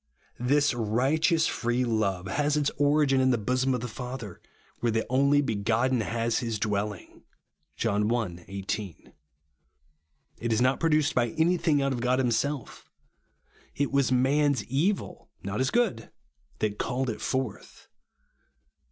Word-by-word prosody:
This 140 +4 +2
righteous 135 - +1
free 120 +1 0
love 100 -6 0
has 145 +10 0
its 145 -1 +1
origin 145 -2 +3
in 130 - +3
50 - - +4
RIGHTEOUS 105 - -10
GRACE. 125 +2 +1
the 130 - 0
bosom - - +3
of 125 - -4
tlie 120 -3 -6
Father, 125 -6 -7 0.4
where 120 - +1
the 110 0 0
only 140 +2 +4
begotten 115 +2 +1
ha? 115 +2 -2
his 115 -1 -1
dwelhng 105 -2 -3 0.5
(John 105 -1 0
i. 90 -8 -2
18). 100 -1 -5 1.3
It 115 0 -2
is 110 - +2
not 130 +2 +2
produced 155 -3 +2
by 120 -1 +2
anything 160 -3 +2
out 135 -1 0
of 120 - -4
God 125 +1 +2
himself. 130 +2 -2 0.9
It 145 - -1
was 140 -2 +2
man's 135 0 +2
evil, 165 +11 -2
not 100 +3 -3
his 130 0 +1
good, 225 - 0 0.5
that 105 -1 -2
called 130 -1 -1
it 110 - -8
forth. 130 -5 -4
125 Hz, 150 wpm, -27 LUFS, 110-140 Hz, 1.3 s, 50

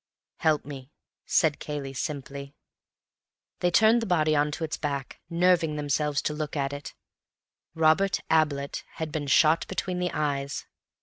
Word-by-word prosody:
"Help 155 -2 +1
me," 135 -2 -8 0.4
said 155 -3 +2
Cayley 145 -2 -5
simply. 140 0 -5 1.0
They 180 - +2
turned 220 +6 +5
the 225 - -3
body 155 -4 +2
on 145 0 +2
to 165 - -4
its 155 - -2
back, 140 -3 -4
nerving 170 -2 +3
themselves 150 -1 0
to 150 - -1
look 150 0 -4
at 140 0 -1
it. 145 0 -7 0.8
Robert 165 +5 +3
Ablett 145 -3 +1
had 160 -1 -4
been 145 -1 -3
shot 155 +4 +4
between 185 -1 -3
the 180 0 0
eyes. 140 -2 -2
150 Hz, 145 wpm, -27 LUFS, 140-165 Hz, 1.0 s, turned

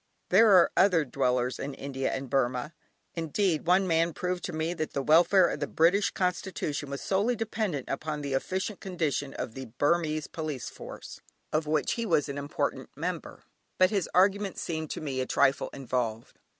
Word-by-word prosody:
There 220 +4 +6
are 180 -2 +6
other 180 -5 +4
dwellers 125 -1 0
in 140 0 -4
India 135 -1 -3
and 135 0 -4
Burmah; 130 +3 0 0.4
indeed, 165 0 0
one 185 +2 +4
man 165 -1 +2
proved 180 -1 -2
to - - -4
me 160 +1 -2
that 155 -3 -4
the 140 - -1
welfare 175 +5 +5
of - - -4
the 145 - -2
British 180 +8 +3
Constitution 180 -6 -2
was 140 0 -5
solely 205 +6 +1
dependent 215 - -2
upon 150 +2 -3
the 140 -1 -3
efficient 190 +8 -2
condition 155 -7 -2
of 110 - -5
the 130 +1 -7
Burmese 155 +5 0
police 155 -6 -5
force, - - -10 0.3
of 155 0 0
which 155 -1 +1
he 230 -1 -2
was 155 -6 +2
an 140 0 -4
important 145 +1 -3
member, - - -5 0.3
but 185 0 +5
his 200 -4 0
arguments 195 +1 +2
seemed 160 -2 -3
to - - -5
me 135 -4 -2
a 130 - -3
trifle 135 - +2
involved. 120 -4 -3
155 Hz, 175 wpm, -28 LUFS, 140-185 Hz, 0.4 s, There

